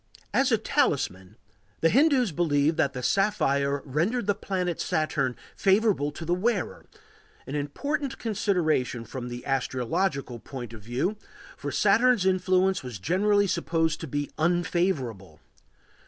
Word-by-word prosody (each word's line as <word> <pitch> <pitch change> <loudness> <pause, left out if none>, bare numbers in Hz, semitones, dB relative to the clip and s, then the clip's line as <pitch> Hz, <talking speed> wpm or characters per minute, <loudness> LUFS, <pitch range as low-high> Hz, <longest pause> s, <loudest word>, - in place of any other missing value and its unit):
As 265 -1 +3
a 225 - +5
talisman 140 - -1 0.4
the 165 - +5
Hindus 265 - +4
believed 155 -1 +2
that 140 - +1
the 125 - -5
sapphire 140 - +1
rendered 175 - 0
the 205 - +2
planet 185 -4 -2
Saturn 155 -5 0 0.2
favorable 195 -7 +2
to 165 - -7
the 170 - +1
wearer, 195 -1 -1 0.6
an 130 - -7
important 270 - -2
consideration 170 - 0
from 125 0 -6
the 120 0 -7
astrological 135 +1 -1
point 120 -1 -8
of 110 - -10
view, 125 - -2 0.4
for - - -5
Saturn's 230 0 +3
influence 185 0 +2
was 125 -5 -7
generally 200 - +2
supposed 165 -4 0
to 165 - -5
be 145 +1 -3
unfavorable. 160 - 0
165 Hz, 130 wpm, -27 LUFS, 135-200 Hz, 0.6 s, a